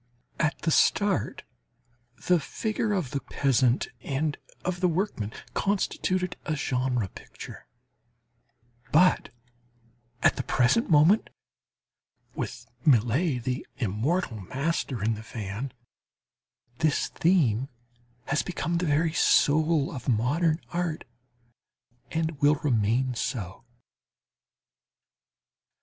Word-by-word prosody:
At 155 Hz, -1 st, +1 dB
the 160 Hz, -, +1 dB
start 200 Hz, +4 st, +2 dB, 0.8 s
the 180 Hz, -1 st, +4 dB
figure 215 Hz, +7 st, -2 dB
of 180 Hz, -11 st, -1 dB
the 140 Hz, -, -1 dB
peasant 130 Hz, -3 st, +1 dB
and 145 Hz, +2 st, -1 dB, 0.3 s
of 180 Hz, 0 st, -1 dB
the 180 Hz, -, +3 dB
workman 165 Hz, -, -1 dB, 0.2 s
constituted 185 Hz, -2 st, 0 dB
a 155 Hz, -, -1 dB
"genre" 125 Hz, -6 st, 0 dB
picture; -, -, -11 dB, 1.2 s
but 180 Hz, +4 st, +4 dB, 0.9 s
at -, -, +4 dB
the -, -, -1 dB
present 130 Hz, -, +2 dB
moment, 165 Hz, +7 st, +5 dB, 1.0 s
with 120 Hz, -, -5 dB, 0.2 s
Millet, 125 Hz, -, +3 dB
the 125 Hz, +1 st, -2 dB
immortal 115 Hz, -, -1 dB
master 135 Hz, -, -2 dB
in 115 Hz, +1 st, +2 dB
the 110 Hz, -, -6 dB
van, 110 Hz, +3 st, -5 dB, 1.1 s
this 155 Hz, -2 st, +2 dB
theme 135 Hz, -, +2 dB, 0.6 s
has 145 Hz, +2 st, +1 dB
become 170 Hz, -1 st, -2 dB
the 180 Hz, -, -1 dB
very 155 Hz, +2 st, +2 dB
soul 155 Hz, -2 st, +3 dB
of 130 Hz, -1 st, -5 dB
modern 150 Hz, +8 st, +2 dB
art 175 Hz, -2 st, -2 dB, 1.1 s
and 160 Hz, -2 st, -2 dB
will 145 Hz, +1 st, +5 dB
remain 125 Hz, -2 st, +1 dB
so. 115 Hz, -6 st, -4 dB
145 Hz, 100 wpm, -27 LUFS, 125-170 Hz, 1.2 s, moment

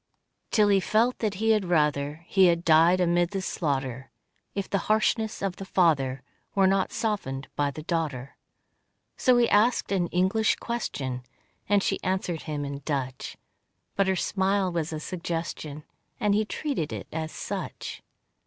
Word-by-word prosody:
Till 210 Hz, -2 st, +4 dB
he 200 Hz, -1 st, +5 dB
felt 225 Hz, +6 st, +2 dB
that 210 Hz, -3 st, -1 dB
he 220 Hz, +3 st, +2 dB
had 210 Hz, -3 st, +2 dB
rather 150 Hz, -2 st, +1 dB
He 190 Hz, +1 st, +4 dB
had 170 Hz, 0 st, +1 dB
died 165 Hz, +3 st, +5 dB
amid 175 Hz, -1 st, +2 dB
the 195 Hz, -, -3 dB
slaughter, 135 Hz, -7 st, -2 dB, 0.5 s
If 200 Hz, -1 st, -2 dB
the 195 Hz, -, 0 dB
harshness 220 Hz, 0 st, +1 dB
of 190 Hz, -2 st, -2 dB
the -, -, -6 dB
father 140 Hz, -9 st, +2 dB, 0.3 s
Were 195 Hz, -1 st, +4 dB
not 195 Hz, 0 st, +2 dB
softened 140 Hz, -, -2 dB
in 145 Hz, -1 st, +1 dB
the 155 Hz, -, -6 dB
daughter. 150 Hz, -6 st, -3 dB, 0.8 s
So 255 Hz, -1 st, +4 dB
he 240 Hz, -1 st, +4 dB
asked 225 Hz, +3 st, +3 dB
an 185 Hz, -3 st, +1 dB
English 190 Hz, +6 st, +2 dB
question, 135 Hz, -, -3 dB, 0.5 s
And 205 Hz, -1 st, +4 dB
she 195 Hz, -, 0 dB
answered 185 Hz, -3 st, -1 dB
him 145 Hz, -1 st, -2 dB
in 140 Hz, 0 st, -5 dB
Dutch, 130 Hz, -3 st, -3 dB, 0.6 s
But 195 Hz, -1 st, +2 dB
her 190 Hz, -, +2 dB
smile 190 Hz, 0 st, +1 dB
was 165 Hz, -2 st, -2 dB
a 155 Hz, -, -3 dB
suggestion, 165 Hz, -3 st, -4 dB, 0.4 s
And 205 Hz, -1 st, +2 dB
he 215 Hz, +1 st, +2 dB
treated 240 Hz, -, -3 dB
it -, -, -5 dB
as 160 Hz, 0 st, -3 dB
such. -, -, -5 dB
175 Hz, 160 wpm, -27 LUFS, 150-200 Hz, 0.8 s, he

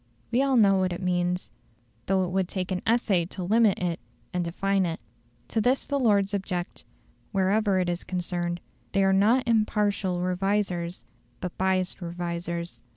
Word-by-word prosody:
We 240 Hz, +3 st, +3 dB
all 275 Hz, -2 st, +3 dB
know 200 Hz, -3 st, +5 dB
what 185 Hz, -1 st, +1 dB
it 175 Hz, -, -5 dB
means, 180 Hz, 0 st, 0 dB, 0.6 s
though 190 Hz, 0 st, +2 dB
it 180 Hz, -, -2 dB
would 190 Hz, -1 st, +1 dB
take 185 Hz, -1 st, -3 dB
an 180 Hz, -, -1 dB
essay 220 Hz, -7 st, +2 dB
to 185 Hz, +1 st, -6 dB
limit 215 Hz, +2 st, +4 dB
it 175 Hz, -2 st, -2 dB, 0.3 s
and 180 Hz, 0 st, 0 dB
define 195 Hz, +3 st, 0 dB
it. 165 Hz, 0 st, -4 dB, 0.5 s
To 225 Hz, -, +1 dB
this 255 Hz, +5 st, +2 dB
the 280 Hz, -1 st, -1 dB
Lords 205 Hz, -5 st, +3 dB
object; 185 Hz, -3 st, -3 dB, 0.5 s
wherever 195 Hz, +1 st, +2 dB
it 180 Hz, -1 st, +1 dB
is 175 Hz, 0 st, -2 dB
concerned, 175 Hz, -1 st, -3 dB, 0.3 s
they 195 Hz, -1 st, +3 dB
are 195 Hz, 0 st, +4 dB
not 225 Hz, +7 st, +3 dB
impartial 210 Hz, -4 st, +1 dB
revisers, 185 Hz, -1 st, -1 dB, 0.3 s
but 180 Hz, -1 st, -5 dB
biassed 190 Hz, 0 st, 0 dB
revisers. 170 Hz, 0 st, -4 dB
190 Hz, 160 wpm, -27 LUFS, 175-205 Hz, 0.6 s, know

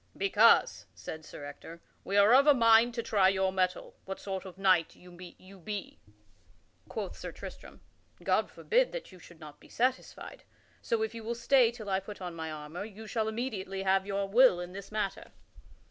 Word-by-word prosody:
"Because," 205 Hz, +4 st, +4 dB
said 160 Hz, 0 st, -8 dB
Sir 145 Hz, -1 st, -10 dB
Ector, 165 Hz, +3 st, -10 dB, 0.2 s
"we 200 Hz, -, -1 dB
are 205 Hz, +3 st, +6 dB
of 275 Hz, +3 st, +6 dB
a 295 Hz, -, +7 dB
mind 230 Hz, 0 st, +5 dB
to 235 Hz, -, -2 dB
try 200 Hz, -4 st, +3 dB
your 190 Hz, 0 st, +1 dB
mettle 185 Hz, -1 st, -1 dB
what 190 Hz, 0 st, -6 dB
sort 190 Hz, -1 st, -5 dB
of 185 Hz, -2 st, -10 dB
a -, -, -18 dB
knight 185 Hz, -4 st, +3 dB
you 180 Hz, 0 st, -16 dB
be." 185 Hz, +3 st, -9 dB, 0.9 s
Quoth -, -, -5 dB
Sir -, -, -7 dB
Tristram: -, -, -11 dB, 0.4 s
"God -, -, +1 dB
forbid -, -, +1 dB
that -, -, -7 dB
you 185 Hz, -, -15 dB
should 170 Hz, -2 st, -16 dB
not 150 Hz, -2 st, -12 dB
be -, -, -19 dB
satisfied. 255 Hz, +2 st, -3 dB, 0.4 s
So 225 Hz, -1 st, -1 dB
if 220 Hz, +1 st, -3 dB
you 230 Hz, -1 st, -8 dB
will 235 Hz, +2 st, -3 dB
stay 240 Hz, 0 st, +4 dB
till 230 Hz, -3 st, -9 dB
I 190 Hz, -1 st, +1 dB
put 205 Hz, +2 st, -10 dB
on 180 Hz, -2 st, -6 dB
my 160 Hz, -1 st, -5 dB
armor 155 Hz, +4 st, -7 dB
you 220 Hz, +1 st, -10 dB
shall 220 Hz, 0 st, -2 dB
immediately 210 Hz, -5 st, -4 dB
have 190 Hz, 0 st, +1 dB
your 200 Hz, 0 st, -2 dB
will 230 Hz, -2 st, +5 dB
in 180 Hz, 0 st, -7 dB
this 200 Hz, +1 st, -9 dB
matter." 210 Hz, -2 st, -4 dB
195 Hz, 190 wpm, -30 LUFS, 185-225 Hz, 0.9 s, a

